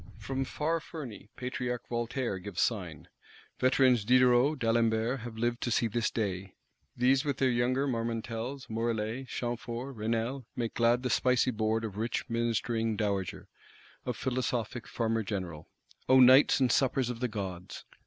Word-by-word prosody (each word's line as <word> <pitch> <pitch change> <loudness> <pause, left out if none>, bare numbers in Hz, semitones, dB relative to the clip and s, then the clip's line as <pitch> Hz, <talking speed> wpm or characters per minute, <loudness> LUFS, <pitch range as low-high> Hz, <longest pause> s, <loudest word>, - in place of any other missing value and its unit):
From 135 +5 -3
far 160 +5 -1
Ferney, 135 - -9
Patriarch 125 -1 -4
Voltaire 120 -3 -2
gives 95 0 -6
sign: - - -1 0.5
veterans 130 -3 +4
Diderot, 125 +5 +4
D'Alembert 115 +1 +1
have 115 -1 -8
lived 120 +1 -1
to - - -1
see 115 - +2
this 115 0 0
day; 95 -4 -3 0.4
these 130 +2 +3
with 140 -3 -1
their 130 -1 +2
younger 125 +3 +1
Marmontels, 115 +2 -3
Morellets, 115 +2 -2
Chamforts, 120 +2 -4
Raynals, 115 +4 -2
make 115 -2 -2
glad 120 +1 +2
the 125 - 0
spicy 125 0 +3
board 110 0 0
of 105 -2 -6
rich 115 +3 -2
ministering 115 -1 0
Dowager, 100 -4 -2 0.6
of 125 -3 -3
philosophic 125 -2 -2
Farmer 115 -1 0
General. 95 -7 -5 0.4
O 130 0 +7
nights 130 +3 +7
and 130 -3 +3
suppers 130 -2 +2
of 115 - -7
the 125 - 0
gods! 95 -5 -6
120 Hz, 145 wpm, -30 LUFS, 110-130 Hz, 0.6 s, O